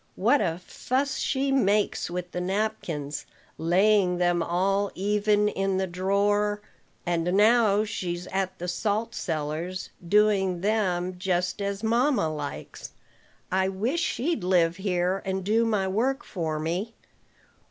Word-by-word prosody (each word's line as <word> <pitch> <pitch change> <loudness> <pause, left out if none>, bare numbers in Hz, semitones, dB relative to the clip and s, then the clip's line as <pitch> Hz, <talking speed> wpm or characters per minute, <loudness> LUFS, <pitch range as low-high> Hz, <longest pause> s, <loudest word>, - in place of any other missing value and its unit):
What 285 - +3
a 165 +1 -1
fuss 270 +2 -1
she 270 0 0
makes 210 -9 +1
with 180 0 -5
the 180 - -3
napkins, 180 -7 -3 0.3
laying 185 +2 +3
them 175 -1 +2
all 195 +4 +1
even 210 +1 +2
in 195 -2 0
the 190 - +1
drawer. 200 +3 +1 0.5
And 170 -2 0
now 215 -1 +4
she's 180 -4 -4
at 190 -1 -2
the 180 - -5
salt 215 +5 -1
cellars, 165 +3 -3
doing 195 -1 +2
them 185 -4 0
just 180 +1 -1
as 200 +1 -3
mamma 235 - +2
likes. 145 -2 -7 0.6
I 190 +1 +2
wish 225 - -1
she'd 320 - -1
live 175 -2 +2
here, 185 -1 0
and 190 0 -2
do 220 +4 +2
my 210 -4 +1
work 245 +8 0
for 160 -4 -3
me. 175 +9 -3
190 Hz, 130 wpm, -26 LUFS, 175-210 Hz, 0.6 s, now